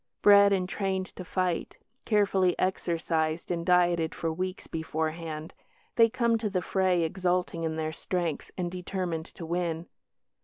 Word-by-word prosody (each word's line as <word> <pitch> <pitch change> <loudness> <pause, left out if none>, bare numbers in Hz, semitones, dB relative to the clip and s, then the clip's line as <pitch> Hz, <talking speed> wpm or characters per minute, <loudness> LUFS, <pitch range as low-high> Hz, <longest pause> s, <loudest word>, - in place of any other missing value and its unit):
Bred 200 0 +8
and 185 -2 +1
trained 190 -1 -1
to 185 - -6
fight, 180 -1 -2 0.3
carefully 195 -4 +2
exercised 165 -3 -1
and 170 -1 -1
dieted 175 -2 +3
for 165 -1 -2
weeks 185 +2 -4
beforehand, 160 0 -4 0.4
they 230 -1 +6
come 235 -1 +1
to 215 -2 -1
the 185 -3 -1
fray 185 -3 +2
exulting 180 0 -1
in 160 -1 -1
their 160 0 -2
strength 170 -2 -2
and 175 -2 -2
determined 180 -3 -3
to 170 - -9
win. 170 -1 -2
180 Hz, 145 wpm, -28 LUFS, 165-190 Hz, 0.4 s, Bred